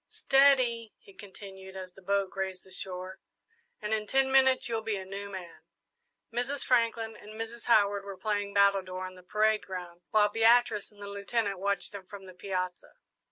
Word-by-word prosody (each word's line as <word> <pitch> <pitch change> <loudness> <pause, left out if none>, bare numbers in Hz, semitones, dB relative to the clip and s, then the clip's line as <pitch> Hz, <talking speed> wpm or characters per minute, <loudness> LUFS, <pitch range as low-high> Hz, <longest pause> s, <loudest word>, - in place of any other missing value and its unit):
"Steady," 255 -5 +3
he 195 - -18
continued, 190 -1 -11
as 185 -1 -8
the 195 - -16
boat 195 0 0
grazed 190 -1 -4
the 190 - -18
shore, 185 0 -5 0.6
"and 210 +1 -2
in 215 -1 -1
ten 265 +3 +2
minutes 265 -1 +4
you'll 225 -2 -1
be 220 -1 -2
a 190 -1 -5
new 200 +1 -6
man." 185 -4 -9 0.7
Mrs. 265 +4 -1
Franklin 230 -2 +1
and 215 +1 -12
Mrs. 230 +1 -6
Howard 205 -3 +4
were 200 -1 -8
playing 205 +1 -1
battledore 195 -2 +2
on 185 - -8
the 185 - -14
parade 215 +3 +2
ground, 180 -2 -7
while 210 -1 +5
Beatrice 225 0 +3
and 205 -1 -13
the - - -6
Lieutenant 200 0 -2
watched 200 0 -1
them 200 -3 -9
from 200 -2 -10
the 185 - -11
piazza. 185 -1 -4
200 Hz, 180 wpm, -30 LUFS, 190-225 Hz, 0.7 s, while